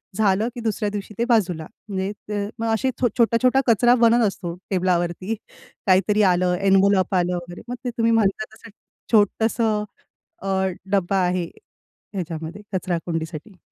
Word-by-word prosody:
झालं 210 +1 +2
की 240 - -6
दुसऱ्या 215 -2 -1
दिवशी 205 0 -6
ते 235 - +1
बाजूला. 180 -9 +2 0.2
म्हणजे 190 0 -2 0.2
द 205 -1 -2
मग 230 - -1
असे 260 +4 +1
छोटा-छोटा 245 +2 +3
कचरा 240 +2 +5
बनत 235 -1 +4
असतो, 175 -3 -5
टेबलावरती 185 +2 0 0.5
काहीतरी 195 +3 +4
आलं, 180 -2 +3
एन्व्हलप 195 0 +3
आलं 180 0 +1
वगैरे. 175 0 -7
मग 245 - -4
ते - - 0
तुम्ही 230 0 +3
म्हणता 215 -1 +2
तसं 225 +1 -14 0.4
छोटसं 220 0 +2 0.6
अ, - - -6 0.4
डब्बा 195 -1 +1
आहे 180 -1 0 0.7
ह्याच्यामध्ये 170 +1 -5
कचराकुंडीसाठी. 170 0 -3
200 Hz, 135 wpm, -23 LUFS, 180-225 Hz, 0.7 s, कचरा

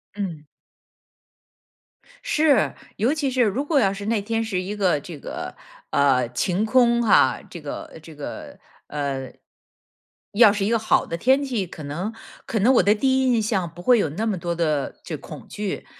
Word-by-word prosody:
嗯。 170 -7 -5 1.8
是， 310 - +3 0.2
尤 240 +8 +2
其 290 -4 -1
是 255 -1 +1
如 235 +7 0
果 290 -2 +2
要 195 -4 +2
是 200 +1 -7
那 220 -2 0
天 225 +2 -1
是 190 -5 -2
一 200 +3 -5
个 180 -7 +2
这 160 +1 -9
个， - - -6 0.4
呃， 130 -4 +3
晴 180 - 0
空 235 0 +4
哈， 215 - +4
这 170 - -9
个， 150 +2 -7
这 155 -1 -13
个， 145 - -8 0.3
呃， 140 -3 -3 1.0
要 215 -1 +7
是 200 -1 -1
一 - - 0
个 230 - +3
好 220 - +2
的 170 - -4
天 265 +8 +3
气， 235 -8 -2
可 155 - -10
能 175 +10 -4 0.3
可 220 - -1
能 245 +7 +4
我 - - +5
的 205 - +5
第 265 +3 +2
一 255 -2 +3
印 225 - +2
象 195 -5 -1
不 175 - -10
会 245 +2 +4
有 160 - +1
那 205 +10 -3
么 205 -4 0
多 170 0 -3
的 155 -4 -1
这 - - -5
恐 - - -11
惧。 205 -2 -4
205 Hz, 200 characters per minute, -23 LUFS, 170-235 Hz, 1.8 s, 要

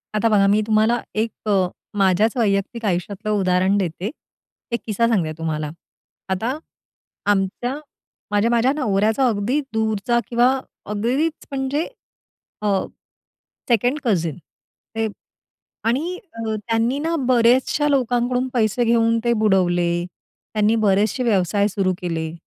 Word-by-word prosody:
आता 225 +2 +2
बघा, 200 -2 +4
मी 210 +2 +3
तुम्हाला 220 +2 +3
एक 220 +1 0 0.2
अ, 190 -3 +3 0.3
माझ्याच 195 +4 +3
वैयक्तिक 215 +1 0
आयुष्यातलं 200 +3 -2
उदाहरण 185 +1 +2
देते. 185 +1 -2 0.6
एक 235 - 0
किस्सा 230 +1 +1
सांगते 185 -9 +1
तुम्हाला. 155 -2 -2 0.6
आता 225 +9 -1 0.7
आमच्या, 205 +6 -1 0.6
माझ्या, 210 +3 +2
माझ्या 240 +3 +3
नवऱ्याचा 220 -1 +2
अगदी 235 +5 0
दूरचा 220 +1 +1
किंवा 245 +1 +3 0.4
अगदीच 260 +10 -1
म्हणजे 275 +3 -1 0.7
अ, 210 - -1 1.0
2nd 245 +5 +2
कझिन 170 - 0
ते. 225 +6 -7 0.8
आणि 290 +11 0 0.2
अ, 225 -1 -3
त्यांनी 230 +5 0
ना 330 +2 -1
बऱ्याचशा 255 +4 +3
लोकांकडून 250 -1 +1
पैसे 230 0 +2
घेऊन 230 0 +3
ते 235 - +3
बुडवले. 175 -3 +2 0.5
त्यांनी 215 +1 +3
बरेचसे 215 +3 +2
व्यवसाय 200 -2 +2
सुरू 195 -2 0
केले. 165 -2 -3
220 Hz, 115 wpm, -21 LUFS, 195-240 Hz, 1.0 s, बघा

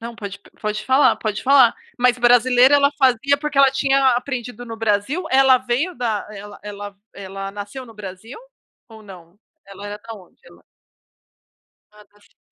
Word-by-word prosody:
Não 235 +1 -8
pode 200 -2 -8
pe - - -22
pode 215 0 -4
falar, 265 +2 +3
pode 215 -2 -4
falar, 265 -3 +5 0.2
mas 250 0 +3
brasileira 245 +2 +4
ela 280 0 +3
fazia 265 +1 +2
porque 300 -2 -3
ela 275 -1 +6
tinha 270 0 +2
aprendido 245 -1 -4
no 225 -1 -8
Brasil 225 - -1
ela 265 -1 +5
veio 255 +8 -2
da 230 -4 -3
ela 205 0 -11
ela 205 -1 -9 0.2
ela 195 0 -8
nasceu 205 +6 -8
no 225 - -15
Brasil 210 - -10 0.5
ou 220 -1 -14
não? 185 -2 -15 0.3
Ela 200 +1 -11
era 205 0 -7
da 225 +2 -10
onde? 185 -5 -18
Ela - - -19 1.3
Ah, 210 0 -18
da 205 +1 -29
Síria, - - -28
230 Hz, 175 wpm, -20 LUFS, 205-260 Hz, 1.3 s, ela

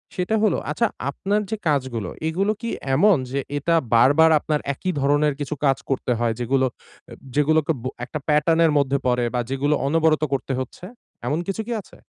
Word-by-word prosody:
সেটা 180 +4 0
হলো 210 -6 +3
আচ্ছা 230 +10 +1 0.2
আপনার 200 +8 -1
যে 220 - -1
কাজগুলো 130 -9 -1 0.2
এগুলো 190 +6 +1
কি 235 - -3 0.3
এমন 200 +5 +5
যে 140 - -1 0.2
এটা 165 +4 +1 0.2
বারবার 145 +7 +6
আপনার 150 0 -1
একই 185 +6 -3
ধরনের 145 +1 +2
কিছু 145 +1 -3
কাজ 135 -1 +3
করতে 130 -2 -1
হয়? 120 -1 +1
যেগুলো 130 +2 +1
অ্যা - - -17 0.2
যেগুলোকে 155 +2 +2
ব - - -9 0.2
একটা 150 +5 -5
প্যাটার্ন 150 +2 +3
এর 160 - +3
মধ্যে 140 0 +1
পড়ে 125 -1 +2
বা - - +1
যেগুলো 140 +3 +1
অনবরত 160 0 +2
করতে 135 0 -2
হচ্ছে। 130 +6 -7 0.4
এমন 150 - 0
কিছু 195 +3 -2
কি - - -4
আছে? - - -19
150 Hz, 185 wpm, -22 LUFS, 135-165 Hz, 0.4 s, বারবার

